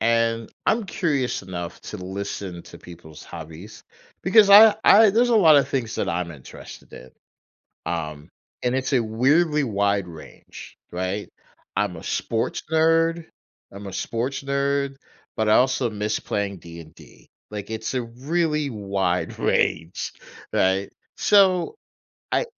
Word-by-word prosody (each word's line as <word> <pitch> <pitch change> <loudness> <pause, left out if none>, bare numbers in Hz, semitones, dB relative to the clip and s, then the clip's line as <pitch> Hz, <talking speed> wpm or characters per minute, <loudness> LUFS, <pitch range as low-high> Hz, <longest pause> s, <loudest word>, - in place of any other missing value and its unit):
and 115 0 +1 0.2
I'm 225 0 +2
curious 150 - -1
enough 85 -2 -7
to - - -7
listen 95 -1 -6
to - - -13
people's 80 -3 -13
hobbies, 85 +5 -10 0.4
because 200 +2 +5
I 210 +1 +9
I 215 +1 +7
there's 235 +4 +3
a 235 - +4
lotta 155 -8 +6
things 115 -5 -3
that 95 - -1
I'm 85 -1 -2
interested 70 -5 -12
in, 65 - -12 0.8
um, 75 -3 -5 0.3
and 125 0 +1
it's 130 +2 -2
a 125 - +4
weirdly 145 +8 +2
wide 100 -4 0
range, 80 -3 -12
right? 95 +3 -3 0.5
I'm - - -1
a - - -10
sports 115 -1 -2
nerd 165 +1 +2 0.5
I'm 100 +1 -9
a 95 - -8
sports 120 +8 -3
nerd, 140 0 -1 0.4
but 110 - 0
I - - +5
also 130 -1 +2
miss 105 0 -2
playing 100 -1 -3
D&D, 85 -2 -14 0.2
like, 105 -1 -6
it's 110 +1 -4
a 130 - 0
really 150 +5 -1
wide 100 -5 -2
range, 80 +3 0 0.4
right? 95 +1 +1 0.3
So 195 - +3 0.6
I - - +1
115 Hz, 135 wpm, -23 LUFS, 95-150 Hz, 0.8 s, I